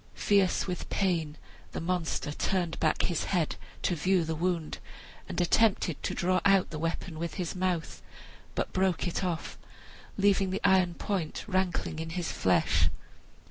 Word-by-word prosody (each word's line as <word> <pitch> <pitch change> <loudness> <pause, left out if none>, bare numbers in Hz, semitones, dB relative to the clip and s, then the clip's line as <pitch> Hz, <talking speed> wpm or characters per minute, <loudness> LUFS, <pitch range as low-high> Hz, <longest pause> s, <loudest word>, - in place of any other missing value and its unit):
Fierce 200 -2 +3
with 180 -2 -4
pain, 165 -6 0 0.4
the - - -3
monster 165 -3 -1
turned 175 +2 -1
back 155 - +2
his 175 -3 0
head 175 -5 0 0.3
to - - +2
view 180 +2 +2
the 160 0 -2
wound, 170 -1 -1 0.5
and - - -2
attempted 180 -2 +2
to - - -2
draw 185 0 +2
out 195 -2 +4
the 155 - -4
weapon 165 0 -3
with 170 -1 -3
his 180 0 -3
mouth, 180 -3 -1 0.5
but - - -2
broke 190 -1 +1
it 175 - -2
off, 175 -3 -3 0.6
leaving 195 -1 +3
the 190 - -2
iron 185 -2 +4
point 190 -5 -2
rankling 185 -5 0
in 160 0 -4
his 175 +1 -2
flesh. 80 -3 +2
180 Hz, 155 wpm, -29 LUFS, 160-190 Hz, 0.6 s, out